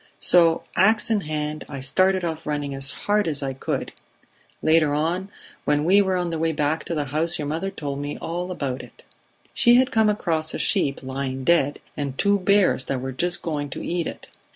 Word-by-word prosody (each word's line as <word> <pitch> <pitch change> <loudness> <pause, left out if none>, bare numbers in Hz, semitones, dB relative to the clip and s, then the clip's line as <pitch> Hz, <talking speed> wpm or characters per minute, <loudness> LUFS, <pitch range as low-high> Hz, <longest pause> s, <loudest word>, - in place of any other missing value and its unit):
So, 170 -2 +4
ax 215 +4 +3
in 215 -2 +2
hand, 150 -1 -3
I 140 -2 -6
started 185 +7 +1
off 160 -2 -4
running 145 -2 -2
as 135 0 0 0.2
hard 210 -1 +2
as 145 -3 0
I 135 -1 -2
could. 130 - -3 0.7
Later 155 -2 +3
on, 175 +6 -1 0.3
when 150 0 +1
we 195 +4 +5
were 190 -2 +1
on 175 -1 -1
the 165 - -3
way 165 0 +1
back 150 +1 0
to 170 - -3
the 150 -2 -1
house, 165 +3 +1
your 150 - -4
mother 165 +6 -2
told 145 -7 -5
me 145 +1 -4
all 175 +2 -4
about 140 -7 -3
it. - - -16 0.5
She 240 0 +5
had 260 +2 +4
come 220 -1 +3
across 165 -7 0
a - - -2
sheep 145 -11 +1
lying 130 0 -4
dead, 145 -3 +2
and 140 -2 -4
two 200 0 +3
bears 195 -7 +3
that 135 - -2
were 130 +1 -4
just 175 +7 -2
going 145 -3 -3
to - - -6
eat 175 -1 -1
it. - - -8
160 Hz, 205 wpm, -23 LUFS, 145-185 Hz, 0.7 s, we